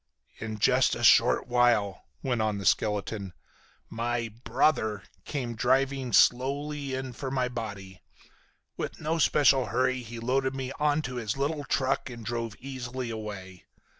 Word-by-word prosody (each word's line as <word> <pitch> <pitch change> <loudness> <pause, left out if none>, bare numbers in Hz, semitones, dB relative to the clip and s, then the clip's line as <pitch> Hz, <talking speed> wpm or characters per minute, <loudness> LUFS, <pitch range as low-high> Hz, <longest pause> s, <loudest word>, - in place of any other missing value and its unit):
"In 110 -1 -5
just - - +3
a - - -5
short - - +5
while," 120 -6 +2 0.2
went 125 -4 0
on 110 -1 0
the 100 - -6
skeleton, 105 -2 0 0.5
"my 115 0 -2
'brother' 110 -5 +1 0.2
came 125 -5 -3
driving 130 +2 +1
slowly 140 +3 +2
in 130 -1 -5
for 135 +2 -5
my 130 -1 0
body. 100 -6 -7 0.8
With - - -5
no 160 +2 -1
special 135 -4 +4
hurry 130 +3 +1
he 120 0 -8
loaded 130 +3 0
me 135 -1 -4
onto 145 -4 0
his 110 0 -2
little 145 +1 -1
truck 135 0 0
and 120 -2 -9
drove 115 -2 -3
easily 130 -2 -5
away. 100 -5 -7
125 Hz, 140 wpm, -28 LUFS, 110-135 Hz, 0.8 s, short